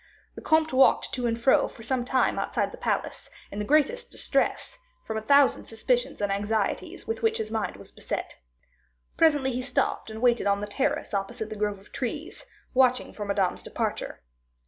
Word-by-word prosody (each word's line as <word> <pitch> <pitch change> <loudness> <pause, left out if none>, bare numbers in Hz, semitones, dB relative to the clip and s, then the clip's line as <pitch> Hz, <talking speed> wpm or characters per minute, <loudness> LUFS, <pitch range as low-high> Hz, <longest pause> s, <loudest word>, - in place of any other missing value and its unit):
The - - -10
comte 315 -2 +2
walked 265 +1 +4
to 250 -2 -1
and 230 0 -1
fro 260 +3 +4
for 225 - -12
some 250 +1 0
time 255 +1 +1
outside - - -1
the - - -10
palace, - - -2 0.2
in 200 - -5
the 210 - -2
greatest 385 - +2
distress, - - -1 0.3
from 220 - -4
a 220 - -1
thousand 280 +5 +4
suspicions 240 +2 -1
and 205 -1 0
anxieties 205 +1 -2
with 450 - -3
which 450 0 +2
his 215 - -4
mind 220 -2 -2
was - - -11
beset. - - -5 0.8
Presently 290 -5 +3
he 250 +1 -2
stopped 250 -3 -1
and 220 0 -7
waited 240 -2 +3
on 200 0 +2
the 205 - -3
terrace 205 0 -1
opposite 220 +3 -3
the - - -4
grove 210 -1 -1
of 195 - -19
trees, 280 +5 -5 0.3
watching 255 -1 +3
for 210 - -5
Madame's 200 -2 0
departure. - - -4
240 Hz, 185 wpm, -27 LUFS, 210-270 Hz, 0.8 s, walked